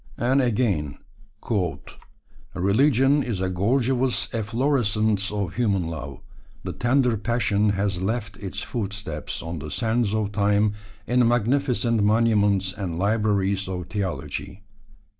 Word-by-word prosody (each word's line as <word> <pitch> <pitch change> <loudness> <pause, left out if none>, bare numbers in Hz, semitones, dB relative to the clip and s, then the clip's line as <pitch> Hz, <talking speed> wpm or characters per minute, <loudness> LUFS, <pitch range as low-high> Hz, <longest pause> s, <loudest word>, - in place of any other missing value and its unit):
And 130 +4 +2
again: 105 - 0 1.6
Religion 135 +9 +3
is 115 -8 -3
a 95 0 -1
gorgeous 120 +2 +1
efflorescence 110 -3 +1
of 100 -4 -2
human 100 -8 0
love. 70 -3 -7 0.4
The - - -4
tender 125 -1 +2
passion 105 -2 +1
has 95 -3 -1
left 105 0 -2
its 100 +1 -5
footsteps 105 -2 -4
on 80 0 -5
the 75 +2 -7
sands 110 +1 0
of 105 -2 -1
time 105 0 +2 0.3
in 125 -1 +3
magnificent 120 -1 +1
monuments 105 -3 +2
and 90 -5 -4
libraries 100 -1 +1
of 90 -2 -5
theology. 100 0 -4
105 Hz, 115 wpm, -24 LUFS, 95-120 Hz, 1.6 s, Religion